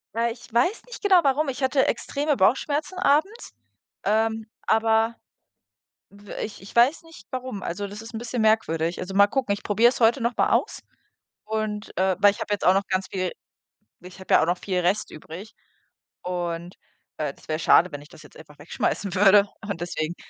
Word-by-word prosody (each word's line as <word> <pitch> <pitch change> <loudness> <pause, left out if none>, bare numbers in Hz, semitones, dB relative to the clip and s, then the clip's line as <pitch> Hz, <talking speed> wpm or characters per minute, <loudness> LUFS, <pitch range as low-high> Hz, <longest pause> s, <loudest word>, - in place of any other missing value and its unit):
Na, 235 +1 +1
ich 235 +1 -10
weiß 350 - +1
nicht - - -10
genau 380 -4 +5
warum. 285 +2 +1
Ich 270 0 -4
hatte 265 +1 +2
extreme 290 0 -1
Bauchschmerzen 290 - +1
abends, 370 - +1 0.5
ähm, 220 +1 0 0.2
aber 225 +1 +2 0.9
w 200 0 -13
ich 215 - -8
ich 195 - -13
weiß 245 +7 +4
nicht, 320 -11 -15
warum. 255 -6 -5
Also, 200 +4 -4
das 205 +2 -9
ist 225 +1 -11
'n 220 - -5
bisschen 240 -1 -3
merkwürdig. 170 -7 +1
Also, 185 +1 -6
mal 200 +1 +6
gucken, 260 -5 -1
ich 200 - -4
probiere 225 +4 +4
es - - -7
heute 235 +3 +4
noch 235 +1 -1
mal - - +2
aus - - 0 0.6
und 215 -1 -4
äh, 190 -1 +2
weil 205 -1 +6
ich - - -12
habe - - -3
jetzt 205 - -1
auch 185 - +6
noch 195 +1 0
ganz 190 0 -1
viel 185 -2 -2 0.7
ich 180 +1 -12
habe 190 - -2
ja - - +5
auch - - -1
noch 175 +1 +1
viel 185 -2 -2
Rest 190 +5 0
übrig 170 +8 -10 0.7
und, 175 -1 -4 0.4
äh, 150 -3 -3
das - - -21
wäre 155 +1 -1
schade, 175 +2 +4
wenn 145 0 -7
ich 150 - -16
das 155 - -15
jetzt - - -17
einfach 150 -2 -15
wegschmeißen 180 +4 -2
würde 200 +1 +6 0.2
und 200 -4 -3
deswegen. 170 -1 -3
210 Hz, 200 wpm, -24 LUFS, 185-240 Hz, 0.9 s, mal